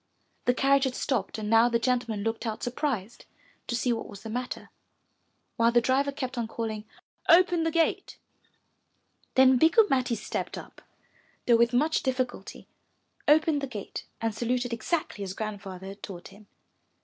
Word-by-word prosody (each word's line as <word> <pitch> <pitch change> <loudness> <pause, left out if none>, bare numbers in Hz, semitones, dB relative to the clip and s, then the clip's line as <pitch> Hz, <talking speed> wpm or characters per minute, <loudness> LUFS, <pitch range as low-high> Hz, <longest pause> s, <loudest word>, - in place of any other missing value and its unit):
The 250 - +3
carriage 275 +1 +3
had 255 -1 -2
stopped 230 -9 -1
and 215 -1 -4
now 225 +2 +5
the 235 - +2
gentleman 230 -3 -1
looked 225 +1 -2
out 220 - -4
surprised 245 -4 -3 0.4
to 240 - -1
see 240 +1 +1
what 225 - -5
was 200 0 -11
the 220 - -6
matter, 250 +2 -5 0.9
while 230 0 +4
the 240 - +5
driver 265 +4 +1
kept 265 -3 -4
on 230 - -2
calling, 220 -2 -4 0.4
*'Open 350 0 +6
the 325 - +1
gate/' 330 0 0 1.2
Then 260 -1 +6
Bikku 345 - +5
Matti 255 -3 +2
stepped - - -4
up, - - -11 0.6
though 240 - +5
with 235 +1 +3
much 300 +6 +2
difficulty, 255 -2 -3 0.6
opened 305 0 +4
the 275 - -3
gate 210 -6 -7
and 225 -1 -1
saluted 245 +2 -1
exactly 235 - -2
as 190 -1 -5
Grandfather 195 -3 -6
had 200 +1 -11
taught 175 -3 -8
him. 200 +1 -17
240 Hz, 160 wpm, -28 LUFS, 220-265 Hz, 1.2 s, Open